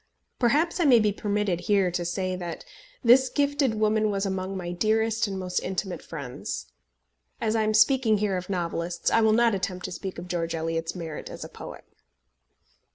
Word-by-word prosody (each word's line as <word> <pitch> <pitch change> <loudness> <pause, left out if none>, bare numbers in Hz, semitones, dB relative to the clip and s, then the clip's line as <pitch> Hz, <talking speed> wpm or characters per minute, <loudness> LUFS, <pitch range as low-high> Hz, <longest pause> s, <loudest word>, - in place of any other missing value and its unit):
Perhaps 300 +9 +2
I 340 - +3
may 255 -4 +7
be 210 -1 +2
permitted 205 -3 -1
here 195 -1 +2
to 175 0 -2
say, 185 +1 -2
that 175 - -6 0.4
this 255 +2 +6
gifted 285 -4 +1
woman 215 0 +2
was 200 -1 -1
among 190 0 -3
my 175 -2 -4
dearest 220 +4 +1
and 195 -1 -4
most 185 -1 -1
intimate 185 0 -3
friends. 125 - -6 0.7
As 220 0 0
I 220 - +2
am 215 0 +1
speaking 225 -1 +4
here 205 -2 0
of 180 +1 -5
novelists, 170 -2 -2
I 230 - +4
will 220 -1 +4
not 235 0 +4
attempt 185 -1 -3
to 185 - -5
speak 190 +1 -6
of 175 +1 -7
George 170 -2 -2
Eliot's 165 +1 -2
merit 165 -4 -6
as - - -7
a - - -8
poet. - - -10
195 Hz, 185 wpm, -26 LUFS, 175-220 Hz, 0.7 s, may